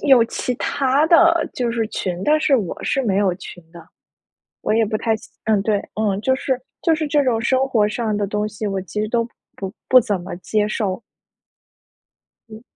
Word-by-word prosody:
有 260 -5 +5
其 250 +1 -3
它 275 +4 +1
的， 335 0 +5
就 245 -2 -1
是 225 -2 -1
群。 180 -2 -3
但 305 +1 +4
是 275 -3 +4
我 200 -7 -4
是 270 - 0
没 200 -5 0
有 195 -3 +2
群 180 -2 -10
的。 170 -1 -12 0.8
我 - - 0
也 225 0 +3
不 215 0 -1
太 225 0 0
想 220 - -14
嗯， 215 -3 +2
对， 205 -1 +1 0.4
就 260 +2 +2
是 265 -1 -1 0.2
就 330 - +3
是 310 -1 -1
这 290 -1 +2
种 235 -4 +1
生 260 +3 +2
活 220 -5 +2
上 215 -1 -2
的 205 -1 -1
东 210 +1 -1
西， 210 0 -5
我 195 -1 -2
其 190 +3 -6
实 215 - -1
都 230 +1 +1 0.3
不 195 -1 -5 0.2
不 255 - +8
怎 205 -3 -1
么 175 0 -7
接 210 +2 0
受。 205 -1 -2 1.5
嗯。 220 +1 -11
220 Hz, 210 characters per minute, -20 LUFS, 205-260 Hz, 1.5 s, 不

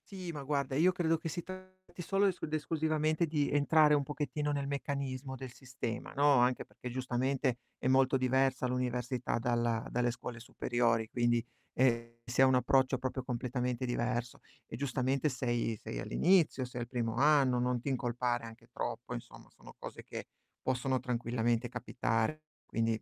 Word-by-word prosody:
Sì, 185 -3 -6
ma 145 -3 -6
guarda, 140 -2 -1
io 170 +6 +5
credo 165 -2 +1
che 165 - -5
si 175 - -3
tratti 185 0 -10
solo 195 +3 +2
es 190 -3 +2
ed 155 - -4
esclusivamente, 155 +1 +1
di 150 -2 +1
entrare 150 +1 +5
un 145 -1 +3
pochettino 150 +1 -2
nel 140 -1 -1
meccanismo 140 -1 -3
del 130 -1 -8
sistema, 125 -3 -5
no, 145 0 +5
anche 125 +1 +2
perché 125 - -8
giustamente 130 0 0 0.2
è - - -2
molto 135 0 +4
diversa 130 0 +2
l'università 125 -1 -1
dalla 120 -2 0
dalle 120 0 +1
scuole 120 0 -7
superiori, 115 -1 0
quindi, 120 -1 +1 0.3
ehm, 115 -2 +2
si 125 +2 +1
ha - - +9
un 130 -1 +4
approccio 130 +1 +3
proprio 130 0 -3
completamente 125 0 -2
diverso. 120 -1 -2 0.3
E - - -7
giustamente 135 +1 0
sei 120 -3 -1
sei - - -5
all'inizio, 165 - +3
sei 125 0 -6
al 120 - -4
primo 115 -2 -2
anno, 135 -2 +4
non 125 0 +1
ti 120 - -9
incolpare 120 -2 0
anche 115 0 -11
troppo 120 0 -4
insomma, 120 -1 -9
sono - - -15
cose - - -8
che, - - -7 0.4
possono 130 0 0
tranquillamente 120 -1 0
capitare. 125 +3 -1 0.2
Quindi, 115 -1 0
130 Hz, 165 wpm, -33 LUFS, 120-145 Hz, 0.4 s, ha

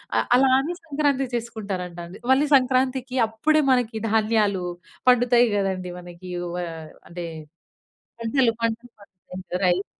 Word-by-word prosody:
అ - - +4 0.2
అలా 265 0 +4
అని 330 +6 -3
సంక్రాంతి 280 -3 0
చేసుకుంటారంట 200 -7 -5
అండి. 185 - -12
మళ్ళీ 280 +3 +4
సంక్రాంతికి 260 0 +1
అప్పుడే 305 +8 +2
మనకి 235 -3 +1
ధాన్యాలు 215 -4 +2 0.5
పండుతాయి 245 0 +5
గదండీ. 190 -2 -1
మనకి 175 +1 -10
వోయా 175 -1 -4 0.3
అంటే 175 0 -6 1.0
పంటలు 230 0 +2
పంటలు 230 +1 -2
పండుతాయి 185 -1 -8
రైస్. 180 +3 +1
225 Hz, 120 wpm, -24 LUFS, 185-255 Hz, 1.0 s, పండుతాయి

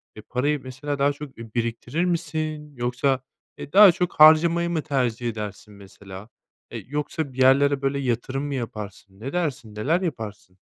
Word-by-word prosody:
eee, 110 - -9
parayı, 145 +3 0
mesela, 135 +3 -5
daha 140 +1 +3
çok, 145 -1 -10
eee, 115 0 -9
biriktirir 120 +7 -1
misin 155 -3 -3
yoksa, 125 +2 0 0.4
eee, - - -9
daha 200 -1 +9
çok 180 +1 -2
harcamayı 165 +2 +6
mı 165 -2 -1
tercih 125 -5 -1
edersin 105 -1 -7
mesela? 100 0 -12 0.4
Eee, - - -6
yoksa 145 0 -3
bir 125 - -15
yerlere 140 +2 +4
böyle 135 0 0
yatırım 130 +1 -2
mı 145 -1 -3
yaparsın? 105 -5 -7
Ne 135 +5 -6
dersin, 145 -11 -3
neler 155 - 0
yaparsın? 105 - -6
135 Hz, 160 wpm, -24 LUFS, 115-150 Hz, 0.4 s, daha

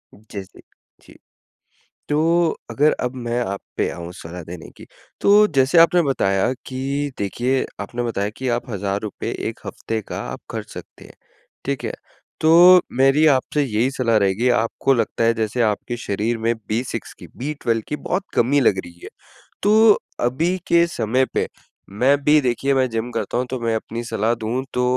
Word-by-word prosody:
जैसे, 100 -2 -10 0.4
जी। - - -18 0.9
तो 150 - +1 0.5
अगर 150 +2 +3
अब 125 +1 -2
मैं 120 -1 -3
आप 100 -4 -3 0.2
पे - - +1
आऊँ 85 0 -7
सलाह 85 +1 -8
देने 85 0 -9
की। - - -13 0.3
तो 210 +1 +6
जैसे 135 +5 +4
आपने 170 +1 +6
बताया 100 -7 +1
कि 140 +2 -3
देखिए 120 +6 -1
आपने 120 +4 -4
बताया 105 -3 -2
कि 130 -1 -3
आप 120 +1 -2
हज़ार 100 -1 -2
रुपए 105 -2 -5 0.2
1 - - -8
हफ़्ते 110 0 -4
का - - -4
आप - - -7
ख़र्च - - -6
सकते - - -11
हैं। - - -15 0.5
ठीक 140 -1 -3
है? - - -2 0.5
तो 175 +3 +8 0.2
मेरी 135 +4 +5
आपसे 145 +1 +2
यही 120 0 0
सलाह 125 -4 +1
रहेगी 100 +4 +2
आपको 120 +3 +1
लगता 115 -1 0
है 115 - +3
जैसे, 110 +2 -2
आपके 110 +3 -1
शरीर 115 +1 -2
में 115 +1 +1 0.2
B6 120 +4 -3
की, - - -11 0.2
B12 125 -6 -1
की 150 - -2
बहुत 185 +5 -2
कमी 140 +4 +3
लग 100 -6 +3
रही 85 0 -14
है। - - -7 0.6
तो 215 +1 +6 0.3
अभी 160 +10 0
के 170 0 +5
समय 125 -2 0
पे - - 0 0.4
मैं 130 +8 +3
भी 150 +1 +5
देखिए 135 +2 0
मैं 130 -1 +2
जिम 115 +1 -3
करता - - -2
हूँ 125 - 0
तो 130 - -3
मैं 115 -1 0
अपनी 115 +1 -4
सलाह 115 0 0
दूँ 125 +4 -1
तो 125 - 0
120 Hz, 175 wpm, -21 LUFS, 110-140 Hz, 0.9 s, तो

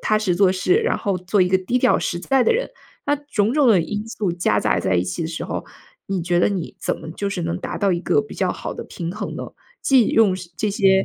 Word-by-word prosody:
踏 215 -1 +2
实 205 -5 0
做 190 +1 +4
事， 185 - +2
然 455 +2 +1
后 200 -4 -1
做 185 +3 0
一 180 - +2
个 190 - +4
低 190 +7 0
调 250 0 +3
实 175 - -2
在 265 +8 +2
的 - - +3
人。 - - -1 0.4
那 290 - +3
种 245 -7 -1
种 290 -2 +4
的 205 -6 +5
因 205 +6 -3
素 210 -6 -2
夹 175 +1 +1
杂 - - +1
在 95 - 0
一 90 - +1
起 90 -1 -4
的 160 - -2
时 165 - -5
候， - - -4 0.4
你 190 -3 -2
觉 175 +1 +1
得 - - +4
你 190 -5 -4
怎 - - -1
么 160 - -8
就 200 +4 -3
是 190 -3 -3
能 170 +1 -2
达 - - -5
到 200 -2 +2
一 170 - -1
个 430 - +2
比 435 - -11
较 - - 0
好 - - -5
的 - - -6
平 170 -1 -5
衡 210 -1 -5
呢？ - - -5 0.4
既 260 -5 +5
用 215 -4 +4 0.2
这 215 - 0
些 195 -2 +3
195 Hz, 290 characters per minute, -21 LUFS, 175-230 Hz, 0.4 s, 的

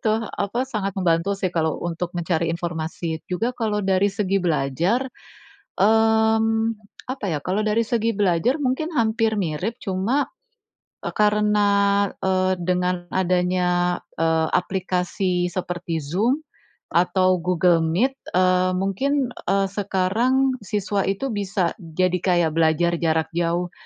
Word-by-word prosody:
Tuh 225 -2 0
apa 230 +5 -2
sangat 205 -7 -3
membantu 180 +2 +1
sih 185 -2 -2
kalau 160 -2 0
untuk 175 +1 -3
mencari 170 -1 0
informasi. 165 -1 -3
Juga 225 +7 -1
kalau 210 -4 -2
dari 195 +1 +3
segi 195 -1 0
belajar, 170 - 0 0.7
mmm, 220 +1 +3 0.4
apa 265 -4 -7
ya 155 - -1
kalau 190 +3 0
dari 215 +2 +1
segi 230 0 0
belajar 195 - +2
mungkin 290 +2 -1
hampir 225 -1 +1
mirip, 185 +5 -2
cuma, 200 +9 0 0.8
eee, - - -3
karena, 210 0 +3 0.6
eee, 185 0 +2
dengan 180 0 0
adanya, 180 -1 +1 0.2
eee, 160 0 +1
aplikasi 180 -1 -1
seperti 175 -2 -3
Zoom 205 - 0 0.5
atau 185 +1 +3
Google 180 0 +3
Meet, 175 +12 +1 0.2
eee, 185 0 +3
mungkin, 250 +8 0 0.2
eee, 195 0 +2
sekarang 225 +7 +1
siswa 205 -1 -1
itu 200 +8 -2
bisa 195 -4 -1
jadi 180 +2 0
kayak 175 -3 +2
belajar 165 +1 +2
jarak 160 -1 +1
jauh. 170 +1 -1
185 Hz, 125 wpm, -23 LUFS, 175-215 Hz, 0.8 s, dari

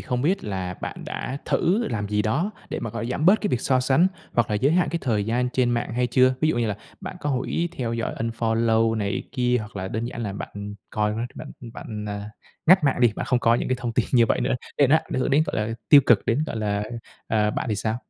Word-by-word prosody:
không 125 0 -2
biết 180 +7 +1
là 95 -3 -3
bạn - - -6
đã 130 - -4
thử 205 +8 +1
làm 105 -5 -3
gì 105 0 +1
đó 145 - 0 0.2
để - - -4
mà, 115 - -4
gọi, 115 +1 -4
giảm 140 +6 -1
bớt 200 +4 +6
cái 210 - -1
việc 125 - 0
so 130 0 +2
sánh 135 +7 +4 0.3
hoặc 120 -3 +2
là - - +1
giới 135 +8 +2
hạn 180 +1 +3
cái 170 - -1
thời 110 -6 0
gian 120 +3 0
trên 125 -2 +2
mạng 120 0 -1
hay 125 +1 +1
chưa? 130 +2 +4
Ví 155 - +3
dụ 160 - +1
như 120 - +1
là 105 -2 -2 0.2
bạn 185 -1 -7
có 145 - -1
huỷ 140 +6 -1
theo 120 -3 -2
dõi 115 -1 -2
unfollow 115 0 +1
này 100 -3 -1
kia, 125 -1 +2
hoặc 110 -1 -8
là 95 -1 -3
đơn 110 +4 -3
giản 120 0 -5
là 105 -3 -3
bạn 100 +1 -7 0.2
coi 105 0 0
nó 105 - -3
rồi 120 - -2
bạn - - -8 0.2
bạn, 105 -3 -7
à, 105 +1 -5 0.4
ngắt 185 0 +6
mạng 135 -3 +2
đi, 120 -3 +5
bạn - - -3
không 125 - +2
coi 115 -1 +3
những - - -2
cái 130 - +1
thông 120 -2 -3
tin 115 0 +1
như 120 -3 +5
vậy - - +1
nữa, 125 - +1 0.2
để 145 - +6
nó 145 +5 +5
ảnh 130 - -3
hưởng 130 - 0
đến, 145 +3 +4
gọi - - -3
là, 110 +1 -1
tiêu 145 - +9
cực 120 - +4
đến, 130 +7 +1
gọi - - -4
là, 105 -2 -1 0.5
à, 105 -1 +2
bạn 120 - -3
thì 110 - +1
sao? 110 +3 -1
120 Hz, 270 wpm, -24 LUFS, 110-130 Hz, 0.5 s, tiêu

